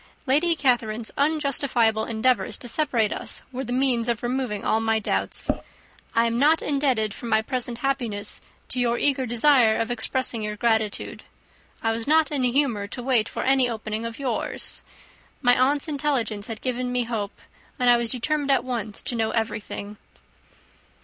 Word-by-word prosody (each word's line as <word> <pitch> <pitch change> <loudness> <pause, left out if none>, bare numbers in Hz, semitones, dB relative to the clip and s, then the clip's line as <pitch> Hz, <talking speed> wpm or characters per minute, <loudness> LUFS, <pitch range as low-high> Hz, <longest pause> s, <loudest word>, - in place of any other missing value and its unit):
Lady 305 +6 +3
Catherine's 235 -6 +1
unjustifiable 275 -7 +1
endeavours 240 +3 +1
to 245 - -7
separate 235 -5 +1
us - - -4
were 260 +1 -4
the 245 - -6
means 250 -2 +1
of 235 -1 -1
removing 240 -4 -2
all 220 - +2
my 225 0 +1
doubts. 220 - -1 0.7
I 230 0 +4
am 230 0 0
not 305 +4 +5
indebted 260 -7 0
for 235 - -8
my 220 -1 +2
present 245 -1 -3
happiness 230 -7 -2 0.3
to 250 - -2
your 240 -1 +2
eager 265 -2 +1
desire 240 -1 +4
of 230 +1 -1
expressing 245 0 -1
your 210 0 -3
gratitude. 220 -2 -1 0.6
I 225 - +2
was 225 +2 -3
not 315 +1 +4
in 280 -3 0
a 250 - +2
humour 240 -7 +1
to 245 +4 -7
wait 240 -4 +2
for - - -4
an 270 0 +3
opening 220 -2 -2
of 230 - -8
yours. 255 -5 -3 0.6
My 245 -2 +4
aunt's 280 +4 +2
intelligence 270 -8 -1
had 225 -2 -6
given 250 -1 -2
me 250 0 +1
hope, 225 -4 -4 0.4
and 250 -3 +1
I 240 0 +7
was 235 -1 -1
determined 285 +4 -1
at 275 - +3
once 225 -5 -4
to - - -1
know 225 -1 0
everything." 210 -2 -3
240 Hz, 170 wpm, -24 LUFS, 220-270 Hz, 0.7 s, I